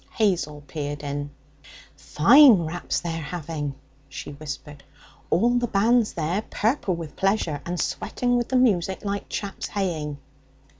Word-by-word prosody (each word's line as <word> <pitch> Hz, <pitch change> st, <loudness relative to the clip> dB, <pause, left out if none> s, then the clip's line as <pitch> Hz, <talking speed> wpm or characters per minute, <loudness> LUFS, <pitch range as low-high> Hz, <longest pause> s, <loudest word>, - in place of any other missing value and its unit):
Hazel 170 Hz, -9 st, 0 dB
peered 145 Hz, -1 st, -5 dB
in. 145 Hz, 0 st, -3 dB, 0.7 s
'Fine 235 Hz, -, +6 dB
raps 175 Hz, +3 st, -2 dB
they're 165 Hz, -1 st, -3 dB
having!' 150 Hz, -3 st, -4 dB, 0.3 s
she 135 Hz, +1 st, -7 dB
whispered. 145 Hz, 0 st, -8 dB, 0.5 s
'All 240 Hz, +6 st, +3 dB
the 240 Hz, -, -1 dB
band's 225 Hz, +2 st, +2 dB
there, 170 Hz, +5 st, -1 dB
purple 220 Hz, -5 st, 0 dB
with 165 Hz, -3 st, -8 dB
pleasure, 195 Hz, -7 st, 0 dB
and 175 Hz, 0 st, -3 dB
sweating 245 Hz, 0 st, -1 dB
with 240 Hz, -1 st, 0 dB
the 260 Hz, -, 0 dB
music 195 Hz, -6 st, +2 dB
like 200 Hz, 0 st, -3 dB
chaps 200 Hz, -1 st, -4 dB
haying.' 160 Hz, -7 st, -2 dB
175 Hz, 135 wpm, -24 LUFS, 150-210 Hz, 0.7 s, Fine